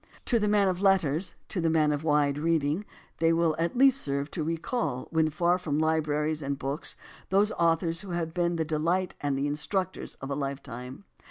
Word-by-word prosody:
To 235 - +2
the 210 - +1
man 205 -1 +3
of 185 0 -1
letters, 185 -4 +2
to 180 - -2
the 165 - +2
man 155 -2 +3
of 145 +1 -2
wide 145 -2 +2
reading, 160 +3 0 0.3
they 165 0 +4
will 165 -1 +2
at 170 +8 -1
least 270 +1 +6
serve 140 +1 -1
to 170 - -3
recall, 165 - -2
when 160 -1 +2
far 175 +4 +1
from 150 -5 -2
libraries 155 -1 0
and 140 0 -2
books, 140 +4 -4 0.3
those 200 +3 +3
authors 165 -1 +1
who 200 - -9
have 170 -2 -2
been 175 -1 0
the 160 -1 -1
delight 165 +4 0
and 145 -2 0
the 140 - 0
instructors 185 +6 -2
of 135 +1 -7
a - - 0
lifetime. 135 0 -5
160 Hz, 195 wpm, -28 LUFS, 145-180 Hz, 0.3 s, least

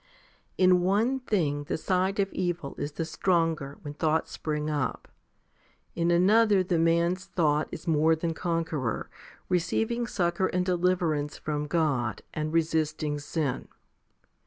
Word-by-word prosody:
10. 185 -1 +5
In 180 -1 +5
one 215 +9 +2
thing 155 - -1
the - - -2
side 185 +4 0
of 195 0 0
evil 175 -5 -2
is 145 - -3
the 165 - -3
stronger 165 -4 0
when 145 - -6
thoughts 160 +1 0
spring 150 -1 -3
up, 150 -3 -2 0.9
in 170 0 0
another 200 +3 +4
the 175 -2 0
man's 170 +3 +2
thought 150 -3 +1
is - - -8
more 160 0 +4
than 165 +1 -2
conqueror, 160 -8 -2 0.4
receiving 225 +7 0
succour 180 -2 0
and 180 0 -1
deliverance 175 -5 0
from 150 -1 -3
God, 145 -8 0
and 155 0 -2
resisting 155 -2 0
sin. 145 -2 -2
165 Hz, 135 wpm, -28 LUFS, 150-180 Hz, 0.9 s, 10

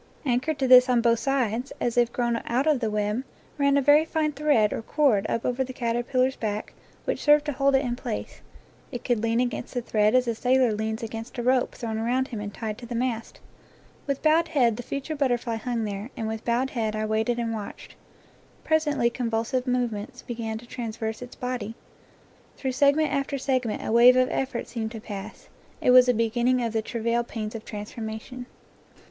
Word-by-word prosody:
Anchored 265 +4 0
to 270 -1 0
this 255 0 +8
on 245 -1 +4
both 230 -1 +3
sides, 250 -1 -1
as 240 - -1
if 240 -1 +3
grown 240 -1 -1
out 250 +4 +1
of 305 -4 +3
the 225 -3 -1
web,, 210 +3 -1 0.4
ran 280 0 +4
a 280 - +2
very 295 +3 +6
fine 315 -1 -1
thread 285 -8 +2
or - - -3
cord 225 -5 +2
up 230 - -1
over 250 +1 0
the 260 0 -7
caterpillar's 250 +2 0
back, 210 -1 -4 0.3
which - - -2
served 295 0 +5
to 295 - -1
hold 275 0 +2
it 270 +1 +2
in 240 -1 -1
place; 245 -3 -6 0.5
it 245 -3 -6
could 240 -4 0
lean 230 +1 +1
against 245 0 -2
the 245 - 0
thread 215 0 +2
as 255 -1 +3
a 235 - +1
sailor 250 0 +2
leans 220 +1 -3
against 225 +2 -6
a 240 - -2
rope 255 0 +2
thrown 220 -2 -4
around 250 +4 0
him 225 - -5
and 205 -1 -5
tied 215 0 -5
to 240 - -9
the 240 - -5
mast. 230 -1 -3 0.7
With 275 -1 -2
bowed 320 +1 +4
head 250 -8 +2
the 245 - -5
future 280 +5 -4
butterfly 245 -5 0
hung 230 0 -2
there, 205 +2 -4
and 225 -2 -2
with 220 0 -4
bowed 245 +3 0
head 220 -3 -1
I 215 0 -1
waited 220 +2 0
and 230 -1 -2
watched. 210 -2 -7 0.7
Presently 295 -6 +2
convulsive 235 +2 -1
movements 240 -4 -2
began 225 -2 -4
to 235 - -11
traverse 225 -2 -5
its 250 0 -9
body; 245 -3 -4 0.8
through 265 - -2
segment 285 +3 +3
after 280 0 -1
seg 260 -2 0
ment 215 - -3
a - - -2
wave 240 +2 +7
of 255 0 +3
effort 265 -2 -2
seemed 230 -2 -4
to 225 - -6
pass. 205 0 -8 0.3
It - - +3
was 250 0 +7
a - - +5
be 230 +1 +2
ginning 245 +1 +2
of 230 - -3
the 220 - +1
travail 235 +1 -1
pains 220 -2 -5
of 225 -1 -7
transformation. 220 +3 -7
240 Hz, 205 wpm, -26 LUFS, 225-260 Hz, 0.8 s, this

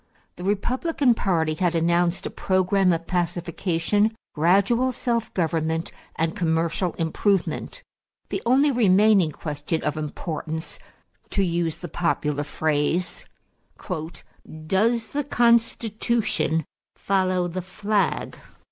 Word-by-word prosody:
The 180 - -9
Republican 255 - +1
party 165 -7 0
had 175 +1 0
announced 170 +2 +1
a - - -3
program 185 0 +2
of 170 0 -1
pacification, 175 +4 0 0.2
gradual 200 +10 +3
self 235 -2 -1
government, 160 -1 -1 0.2
and 165 +1 -1
commercial 165 +1 0
improvement. 195 - -1 0.5
The - - -2
only 270 +5 +4
remaining 205 - +4
question 150 +2 -4
of 150 - -1
importance, 155 +1 -5 0.5
to 195 - +1
use 170 -2 -1
the 175 - -7
popular 150 -4 -1
phrase, 155 +4 -1 1.4
"Does 225 +6 +1
the 290 +1 -2
Constitution 230 - +1 0.3
follow 185 -2 +1
the 180 +2 -4
flag?" 200 +3 -1
180 Hz, 105 wpm, -24 LUFS, 165-215 Hz, 1.4 s, only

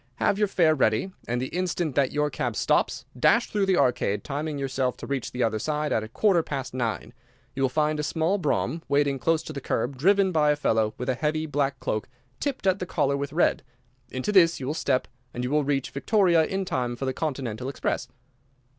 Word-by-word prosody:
Have 200 - +1
your 210 - +3
fare 170 -5 +3
ready, 130 - +1 0.2
and 120 +1 -1
the 130 - -3
instant 175 -4 -1
that 135 -1 +2
your 150 0 0
cab - - -2
stops, - - +1
dash 225 - +3
through 200 -2 +1
the 190 -2 +3
Arcade, 120 -5 +1
timing 150 +1 -3
yourself 130 -2 -1
to - - -8
reach 140 -3 -3
the 125 0 -1
other 110 -1 0
side 150 +4 -1
at - - +1
a 110 - -6
quarter 180 - +2
past 135 -5 -5
nine. 120 -4 -3 0.4
You 135 - -4
will 135 - +3
find 150 +2 0
a - - +1
small 160 +6 0
brougham 165 0 -1
waiting 140 -1 +1
close 160 +6 +1
to 155 - -7
the 140 - -5
curb, 125 +2 -2
driven 195 +6 +3
by 150 -3 +3
a 150 - +4
fellow 110 -6 +1
with 125 - -5
a - - +3
heavy 155 +4 -1
black 140 -2 -1
cloak 110 +3 -3 0.3
tipped 275 -7 -3
at 190 0 +3
the 180 - -4
collar 140 - +1
with 140 0 -3
red. 165 +4 +2 0.5
Into 130 +10 -2
this 170 -4 +5
you 130 - -5
will 145 - -1
step, 135 -5 0 0.3
and 125 - -3
you 125 - -2
will 150 0 +2
reach 140 -1 -1
Victoria 170 +1 +3
in 190 +2 -2
time 125 -9 -2
for 135 - -4
the 130 - -1
Continental 130 -5 -3
express." 130 -1 -2
145 Hz, 220 wpm, -26 LUFS, 130-165 Hz, 0.5 s, this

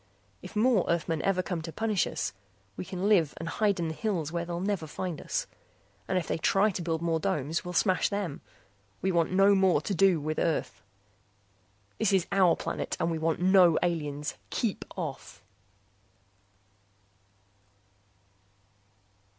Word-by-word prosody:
If - - -11
more 220 -2 +3
Earthmen 165 -2 0
ever 185 -2 +1
come 175 -2 -3
to 165 +1 -6
punish 215 0 0
us, - - -3 0.4
we - - -5
can 185 +1 -3
live 175 -9 +3
and 165 - -6
hide 200 +1 +1
in 170 - -1
the 160 - -3
hills 170 -5 -2
where 170 0 -2
they'll 170 0 -4
never 190 -4 -2
find 175 +1 -5
us. - - -2 0.6
And 185 - 0
if 180 - -2
they - - -1
try 195 +6 +3
to 180 - -4
build 165 -1 -2
more 165 -1 +1
domes 155 +1 -1
here - - -16
we'll 180 - -5
smash 185 +1 +2
them. 200 -8 -3 0.6
We 190 - +2
want 170 -1 +1
no 195 +2 +5
more 190 -5 +4
to 200 - -3
do 190 -2 +4
with 155 +1 -3
Earth. 135 -10 -1 1.2
This 215 -3 +2
is 190 -3 +3
our 185 -4 +4
planet - - -4
and 170 - 0
we 160 - -2
want 165 +1 0
no 185 -3 +6
aliens. 150 -4 -2 0.2
Keep 225 -5 -2
off! 140 - -6
175 Hz, 160 wpm, -29 LUFS, 160-195 Hz, 1.2 s, no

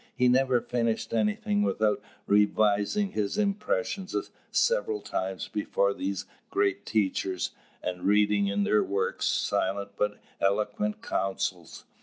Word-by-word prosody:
He 125 -1 +3
never 130 -1 +4
finished 115 -2 -1
anything 210 - +1
without 110 - +1 0.2
revising 105 - +3
his 105 - -1
impressions 205 - -1 0.3
several 475 -3 +1
times 95 - -3
before 100 -1 0
these 95 -1 -3 0.2
great 100 0 0
teachers, 95 -3 0 0.3
and 90 0 -3
reading 105 0 +4
in 100 +1 +1
their 105 +1 +3
works 95 -1 -1
silent 100 +1 0
but 105 0 0 0.2
eloquent 210 - 0
counsels. 95 - -2
105 Hz, 115 wpm, -28 LUFS, -, 0.3 s, never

